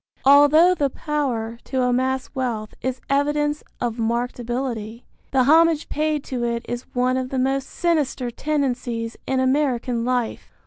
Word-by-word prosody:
Although 290 +6 +7
the 285 -6 0
power 250 -7 -3
to 260 -1 -1
amass 260 +1 0
wealth 235 -6 -3
is 260 0 -3
evidence 295 +1 +1 0.2
of 235 -1 -2
marked 235 +2 -1
ability, 240 -2 -4 0.2
the 265 -1 +3
homage 320 +2 +4
paid 305 -1 -1
to 250 -2 -4
it 235 0 -2
is 240 +1 -5
one 250 +1 +2
of 255 -1 -2
the 265 - -3
most 270 +1 0
sinister 290 -7 0
tendencies 245 -5 -2
in 265 0 +1
American 260 -3 +1
life. 245 -2 -2
260 Hz, 145 wpm, -22 LUFS, 240-285 Hz, 0.2 s, Although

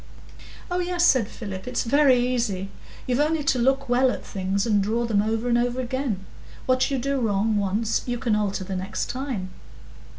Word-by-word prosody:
"Oh, 355 - 0
yes," 350 -1 +1
said 255 -10 +4
Philip, 200 -4 -7
"it's 250 -1 -1
very 275 +2 +4
easy. 235 -6 -1 0.4
You've 250 +1 0
only 305 +1 +1
to 270 -2 +1
look 270 +3 +2
well 250 +2 +3
at - - -4
things, 195 0 -1
and 210 -3 +3
draw 225 +4 0
them 215 -3 +2
over 220 +3 -1
and 240 0 +3
over 245 +1 0
again. 245 -6 -2 0.4
What 255 0 +2
you 275 - 0
do 275 +2 -1
wrong 215 -1 +1
once, 205 +3 0
you 245 0 -1
can 230 -2 0
alter 205 -2 -1
the 190 0 -5
next 190 +3 -3
time." 245 -8 -4
240 Hz, 190 wpm, -24 LUFS, 205-260 Hz, 0.4 s, said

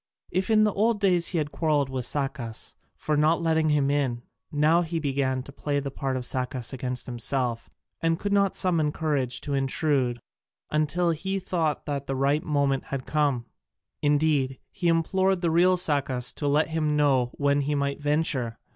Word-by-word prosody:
If 185 +2 -1
in 215 -1 +5
the 210 -2 +2
old 220 +1 +1
days 180 -4 +3
he 175 - -1
had 150 -2 -1
quarrelled 150 -4 0
with 130 -2 -2
Sacas 135 -6 -3 0.2
for 155 - -1
not 155 +3 +3
letting 160 -1 +2
him 145 -2 +2
in, 130 -5 -1 0.3
now 155 +3 +3
he 170 0 -3
began 135 -3 -1
to 140 - -11
play 145 0 -2
the 140 -1 -4
part 135 -1 -2
of 125 - -4
Sacas 125 -1 -1
against 125 -1 -3
himself, 120 -1 -2 0.3
and 165 0 +1
could 200 +3 -2
not 200 -1 +2
summon 165 -5 +1
courage 145 -6 -1
to 145 - -4
intrude 135 -2 +1 0.5
until 155 +3 +1
he 190 +5 -2
thought 165 -5 -1
the 140 -2 -3
right 140 +3 +1
moment 140 -3 0
had 135 -2 -5
come: 145 -6 0 0.6
indeed, 145 -3 +2
he 175 - -2
implored 185 +3 +2
the 170 -2 +1
real 180 +3 +4
Sacas 140 -7 0
to 145 - -3
let 150 +3 +2
him 155 -2 0
know 135 -4 +3
when 140 0 +2
he 145 +1 -1
might 140 0 -1
venture. 145 -6 0
145 Hz, 175 wpm, -26 LUFS, 135-165 Hz, 0.6 s, in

